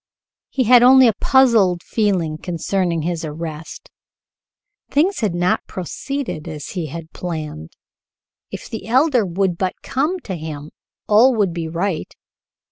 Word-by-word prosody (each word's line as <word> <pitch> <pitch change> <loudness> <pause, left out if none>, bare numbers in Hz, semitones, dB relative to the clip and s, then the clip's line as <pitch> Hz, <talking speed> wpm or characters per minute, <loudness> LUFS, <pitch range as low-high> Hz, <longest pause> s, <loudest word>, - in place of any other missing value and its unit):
He 265 - 0
had 245 +1 +6
only 260 +1 +7
a 225 - +3
puzzled 225 -10 +4
feeling 180 -8 -1
concerning 175 -1 -2
his 170 0 -2
arrest. 155 0 -7 1.0
Things 345 +8 +1
had 205 -7 -1
not 175 +1 0
proceeded 230 - -5
as 150 -2 -7
he 175 -5 -4
had 160 +2 -9
planned. 155 - -6 0.8
If - - -8
the 225 - -7
Elder 260 0 +3
would 180 0 -1
but 185 -1 -1
come 305 +8 -1
to 190 - -6
him, 155 -2 -7 0.4
all 235 +5 +5
would 200 -5 +1
be 165 -1 -4
right. 170 +1 -3
180 Hz, 135 wpm, -20 LUFS, 165-235 Hz, 1.0 s, only